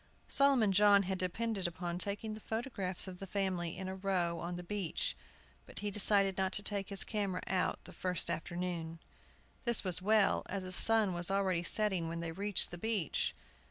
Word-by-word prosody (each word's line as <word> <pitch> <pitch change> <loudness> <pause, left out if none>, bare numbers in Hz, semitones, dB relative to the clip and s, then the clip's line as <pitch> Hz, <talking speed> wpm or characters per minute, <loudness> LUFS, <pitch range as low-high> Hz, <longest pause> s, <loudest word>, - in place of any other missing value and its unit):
Solomon 275 -7 +3
John 200 +1 +5
had 190 0 -3
depended 195 +1 -2
upon 175 +1 -5
taking 205 +3 -2
the 215 - -8
photographs 215 -6 -4
of 180 -1 -9
the 195 - -7
family 185 -4 -2
in 190 - -5
a 190 - -4
row 185 -3 -1
on 175 +1 -5
the 175 - -7
beach; 190 -2 -3 0.5
but - - -9
he 205 0 -3
decided 195 -1 +6
not 190 0 0
to 205 - -4
take 200 -2 -1
his 200 -1 +3
camera 200 -4 -3
out 185 -1 -1
the - - -13
first 180 -2 -1
afternoon. 170 -1 -4 0.7
This 235 -1 0
was 180 -2 -1
well, 210 +1 +2
as 195 0 -4
the 185 - -6
sun 215 +1 +7
was 175 +1 -1
already 190 -3 0
setting 190 -2 0
when 165 +1 -5
they 170 -1 -4
reached 200 +3 0
the 175 - -8
beach. 210 -6 -1
190 Hz, 190 wpm, -33 LUFS, 175-205 Hz, 0.7 s, sun